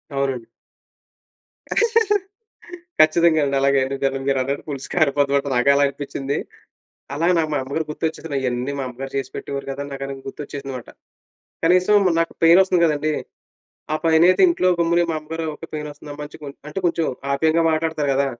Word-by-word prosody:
అవునండి. 135 -4 -1 2.5
ఖచ్చితంగా 160 +1 +5
అండి. 140 0 -1
అలాగే 140 0 +3
అండి. 135 +1 -3
దెబ్బకి 135 0 -1
మీరు 135 -1 +2
అన్నట్టు 140 +2 -3
పులుసు 140 -2 -6
కారిపోతాం 145 -4 +2
అంటే 140 - -5
నాకు 125 +3 +3
అలాగే 140 0 +3
అనిపించింది. 140 0 -4 0.8
అలా 160 +4 0
నాకు 160 -2 0
మా - - +1
అమ్మగారు 150 +4 -3
గుర్తొచ్చేసింది. 160 -1 -3
ఇయన్నీ 125 +1 -2
మా - - -2
అమ్మగారు 135 +2 -7
చేసిపెట్టేవారు 140 +1 -5
కదా! 140 +1 -5
నాకు 135 0 -6
అది 135 - -5
గుర్తొచ్చేసిందిమాట. 135 -3 -7 0.8
కనీసం 180 +4 +4 0.3
నాకు 165 - -1
పెయిన్ 170 +3 +7
వస్తుంది 185 -2 +1
కదండీ. 155 0 0 0.8
ఆ - - +2
పైన 160 0 +4
అయితే 185 - +3
ఇంట్లో 260 - +2
గమ్మునే, 170 +1 +3
మా - - -1
అమ్మగారు 160 +2 -5
ఒక, 165 - -11
"పెయిన్ 150 -1 -4
వస్తుందమ్మా" 145 0 -9
అని 150 - -12
చె - - -10 0.3
అంటే, 150 - -5
కొంచెం 165 -1 0 0.3
ఆప్యాయంగా 160 +4 +2
మాట్లాడుతారు 160 -2 -1
కదా! 140 +1 +2
145 Hz, 160 wpm, -21 LUFS, 135-160 Hz, 2.5 s, పెయిన్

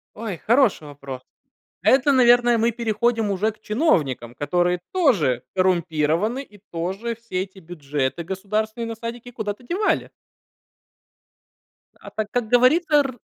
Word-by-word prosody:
Ой, 210 -6 -5
хороший 230 - +3
вопрос. 140 -2 -8 0.6
Это, 270 +2 +4
наверное, 240 -2 +5
мы 230 +1 +3
переходим 225 -1 0
уже 200 +3 0
к 215 0 -23
чиновникам, 150 - 0
которые 175 +4 0
тоже 200 - +2
коррумпированы 180 - +1
и 210 -6 -19
тоже 190 +8 -3
все 225 -5 -4
эти 195 0 -14
бюджеты 150 -4 -3
государственные 215 +5 -3
на 230 - -5
садики 235 +2 -7
куда-то 215 0 -5
девали. 365 - 0 1.9
А - - -11
так, 215 -1 -3
как 245 -2 -1
говорится, 295 +7 +4
р 270 -4 0
215 Hz, 125 wpm, -23 LUFS, 175-240 Hz, 1.9 s, наверное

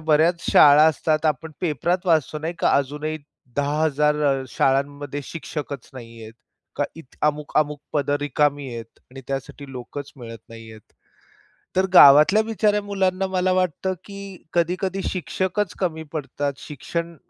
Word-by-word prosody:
बऱ्याच 160 +2 +3
शाळा 145 0 +7
असतात 155 0 0
आपण 155 +2 -1
पेपरात 175 +3 -1
वाचतो 155 -2 +2
नाही 160 +3 -4
का, - - +2
अजूनही 150 +3 -2 0.4
10000 150 +1 +1 0.3
शाळांमध्ये 140 +2 -1
शिक्षकच 150 -5 -6
नाहीये 115 -3 -10 0.5
का 145 - +1
इथं 150 -1 -4
अमुक-मुक 150 0 0
पदं 145 -1 +1
रिकामी 145 -1 0
आहेत 115 -1 -10
आणि 135 +1 -10
त्यासाठी 135 +1 -6
लोकच 135 +3 -8
मिळत 115 -3 -9
नाहीयेत. 115 -1 -12 1.0
तर 185 +1 +3
गावातल्या 155 +8 +8
बिचाऱ्या 210 -2 +1
मुलांना 195 -2 0
मला 185 0 0
वाटतं 185 +1 0
की 200 -1 -10 0.4
कधी-कधी 185 +3 0
शिक्षकच 190 +2 -2
कमी 160 -4 -2
पडतात 145 -1 -3
शिक्षण 170 +4 -5
150 Hz, 125 wpm, -23 LUFS, 140-175 Hz, 1.0 s, गावातल्या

